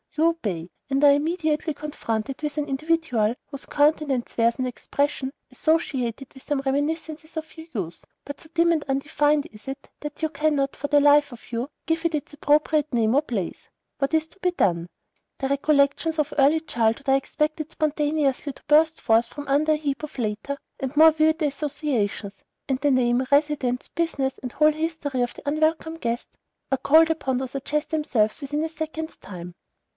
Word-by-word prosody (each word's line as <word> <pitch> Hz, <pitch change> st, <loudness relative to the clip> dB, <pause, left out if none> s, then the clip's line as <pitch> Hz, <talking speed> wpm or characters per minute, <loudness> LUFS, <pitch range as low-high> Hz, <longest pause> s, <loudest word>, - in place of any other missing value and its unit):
You 315 Hz, -, +4 dB
obey, 205 Hz, -, -2 dB, 0.2 s
and 275 Hz, 0 st, +1 dB
are 285 Hz, -, +8 dB
immediately 310 Hz, +1 st, 0 dB
confronted 270 Hz, -4 st, -4 dB
with 300 Hz, 0 st, -3 dB
an 300 Hz, -, 0 dB
individual 275 Hz, -6 st, +1 dB
whose 280 Hz, -2 st, -9 dB
countenance 290 Hz, -4 st, +1 dB
wears 230 Hz, 0 st, +2 dB
an 255 Hz, -, -1 dB
expression 275 Hz, +2 st, -2 dB, 0.2 s
associated 270 Hz, -6 st, -1 dB
with 265 Hz, -, -14 dB
some 290 Hz, -2 st, -1 dB
reminiscences 310 Hz, +3 st, -2 dB
of 315 Hz, 0 st, -6 dB
your 320 Hz, 0 st, -10 dB
youth, 175 Hz, -7 st, -5 dB, 0.2 s
but 285 Hz, -, -7 dB
so 315 Hz, -, -12 dB
dim 340 Hz, 0 st, +4 dB
and 310 Hz, -3 st, 0 dB
undefined 290 Hz, +2 st, +1 dB
is 210 Hz, +3 st, -15 dB
it, 275 Hz, +1 st, -7 dB
that 295 Hz, 0 st, -7 dB
you 315 Hz, -, +1 dB
cannot, 285 Hz, -2 st, 0 dB
for 285 Hz, -, -4 dB
the 290 Hz, 0 st, +5 dB
life 290 Hz, 0 st, +5 dB
of 240 Hz, -1 st, -13 dB
you, 240 Hz, +4 st, -2 dB, 0.2 s
give 325 Hz, 0 st, 0 dB
it 335 Hz, -2 st, +1 dB
its 295 Hz, 0 st, -5 dB
appropriate 300 Hz, +1 st, +2 dB
name 230 Hz, -2 st, +2 dB
or 285 Hz, -, +5 dB
place. 220 Hz, -, -4 dB, 0.3 s
What 275 Hz, +2 st, 0 dB
is 315 Hz, 0 st, +1 dB
to 365 Hz, -, -19 dB
be 365 Hz, -1 st, +1 dB
done? 175 Hz, -, +1 dB, 0.5 s
The 270 Hz, -, -1 dB
recollections 280 Hz, +3 st, +2 dB
of 300 Hz, -, 0 dB
early 290 Hz, +3 st, +5 dB
childhood 235 Hz, -2 st, 0 dB
are 270 Hz, -, +5 dB
expected 305 Hz, +3 st, -1 dB
spontaneously 295 Hz, -2 st, 0 dB
to -, -, -18 dB
burst 315 Hz, +2 st, +4 dB
forth 225 Hz, +1 st, +3 dB
from 290 Hz, +3 st, -8 dB
under 295 Hz, +3 st, +3 dB
a -, -, +1 dB
heap 285 Hz, -2 st, -2 dB
of 305 Hz, -, -7 dB
later 225 Hz, +4 st, -2 dB, 0.2 s
and 265 Hz, 0 st, -3 dB
more 320 Hz, +1 st, +9 dB
vivid 315 Hz, +1 st, +2 dB
associations, 270 Hz, -9 st, -2 dB, 0.3 s
and 265 Hz, -2 st, 0 dB
the 290 Hz, +1 st, +2 dB
name, 250 Hz, -1 st, +3 dB
residence, 280 Hz, -4 st, +2 dB
business, 280 Hz, -6 st, -2 dB
and 250 Hz, -, -6 dB
whole 305 Hz, +3 st, +4 dB
history 310 Hz, -4 st, -2 dB
of 245 Hz, -, -1 dB
the -, -, -12 dB
unwelcome 315 Hz, +2 st, +1 dB
guest 235 Hz, -6 st, -3 dB, 0.4 s
are 270 Hz, -, +2 dB
called 320 Hz, +2 st, +5 dB
upon 265 Hz, -5 st, -1 dB
to 260 Hz, +1 st, -2 dB
suggest 285 Hz, +4 st, -3 dB
themselves 290 Hz, -7 st, +1 dB
within 295 Hz, +2 st, -2 dB
a -, -, -3 dB
second's 315 Hz, 0 st, -5 dB
time. 180 Hz, -2 st, -9 dB
290 Hz, 180 wpm, -24 LUFS, 260-310 Hz, 0.5 s, more